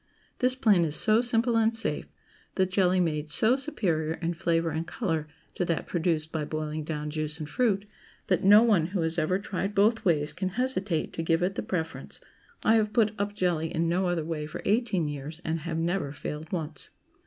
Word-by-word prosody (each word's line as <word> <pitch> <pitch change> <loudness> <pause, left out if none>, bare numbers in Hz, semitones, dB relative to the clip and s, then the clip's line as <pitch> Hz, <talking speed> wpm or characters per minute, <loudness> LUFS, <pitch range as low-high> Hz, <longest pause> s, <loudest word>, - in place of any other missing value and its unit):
This 255 0 +2
plan 210 -9 +4
is 155 -2 -1
so 220 +1 +4
simple 235 -1 +2
and 225 0 +3
safe, 225 - -1 0.5
the 190 - +3
jelly 185 -1 +2
made 155 -3 -1
so 220 +10 +4
superior 175 - -1
in 170 +1 -2
flavor 165 0 0
and 160 +2 -3
color 165 - -2 0.3
to - - -1
that 170 -2 -1
produced 165 -2 0
by 160 -2 -2
boiling 155 0 -3
down 150 -1 -4
juice 155 0 -2
and 155 -2 -6
fruit, 205 0 +1 0.4
that 185 - +1
no 205 +3 +8
one 200 -9 +3
who - - 0
has 165 +1 0
ever 165 +4 +1
tried 200 0 -4
both 220 +3 +3
ways 155 -4 +1
can 190 -1 -2
hesitate 200 -10 -1
to - - -3
give 165 +1 +1
it 185 +2 +1
the - - -3
preference. 165 -3 -4 0.4
I 225 +1 +5
have 215 -1 0
put 220 -3 +3
up 205 0 -2
jelly 170 -4 0
in 165 0 0
no 180 +2 +1
other 170 -3 -1
way 155 -2 -3
for 155 - -7
eighteen 205 -6 +1
years, 145 +2 -6
and 160 +1 -1
have 160 +1 -4
never 165 -3 -1
failed 150 +2 -6
once. 155 -4 -2
170 Hz, 200 wpm, -28 LUFS, 160-205 Hz, 0.5 s, no